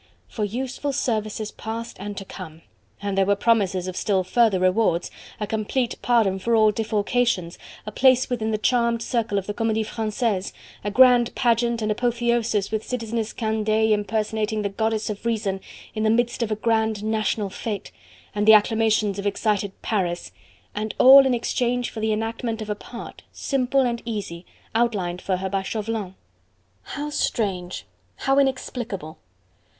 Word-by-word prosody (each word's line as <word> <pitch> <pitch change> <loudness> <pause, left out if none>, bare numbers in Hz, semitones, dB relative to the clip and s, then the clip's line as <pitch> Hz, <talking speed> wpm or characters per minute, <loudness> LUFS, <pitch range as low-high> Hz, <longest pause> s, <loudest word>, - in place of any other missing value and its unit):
"For 210 - -4
useful 260 +6 -3
services 215 -4 -2
past 230 +1 -6
and 205 +1 -6
to 195 - -5
come!" 165 -4 -10 0.4
and 200 -1 -1
there 195 0 +3
were 200 - +4
promises 195 -4 +1
of 185 - -5
still 190 -2 +1
further 220 0 +3
rewards, 185 -1 +2 0.3
a 210 - -1
complete 220 +3 -1
pardon 220 -6 +2
for 230 +4 +1
all 215 -1 +5
defalcations, 210 -3 0 0.3
a 210 - -5
place 255 +2 +4
within 225 -3 -2
the 215 - 0
charmed 235 0 +1
circle 230 -4 -1
of 195 - -1
the 205 - -3
Comedie 220 0 0
Francaise, 215 -3 -2 0.3
a 205 - -1
grand 245 +1 +5
pageant 235 -1 +1
and 215 - 0
apotheosis 235 -3 0
with 220 0 -1
Citizeness 230 -2 -3
Candeille 220 -1 +1
impersonating 215 +1 -1
the 200 - 0
Goddess 220 +2 -1
of 205 - -8
Reason, 215 -4 -1 0.3
in 215 - -3
the 215 - +2
midst 240 +2 +1
of 230 - 0
a - - +2
grand 220 -1 0
national 215 -2 -1
fete, 210 -1 -5 0.4
and 210 0 -1
the 220 - +10
acclamations 215 -1 +3
of 200 - -2
excited 205 -1 0
Paris: 180 -5 -1 0.4
and 215 +1 -3
all 270 +1 +9
in 255 - +2
exchange 245 +1 -1
for 225 - -7
the 220 0 0
enactment 225 +1 -2
of 215 -1 -4
a - - -1
part 235 +3 -10
simple 270 0 0
and 240 -2 0
easy 200 -7 -5 0.3
outlined 200 -7 0
for 190 -2 -1
her 190 +1 -3
by 195 0 -1
Chauvelin!... 210 -2 -4 0.7
How 295 +1 -5
strange! 190 -10 -2 0.3
how 270 +1 +2
inexplicable! 240 - -2
220 Hz, 160 wpm, -24 LUFS, 205-235 Hz, 0.7 s, the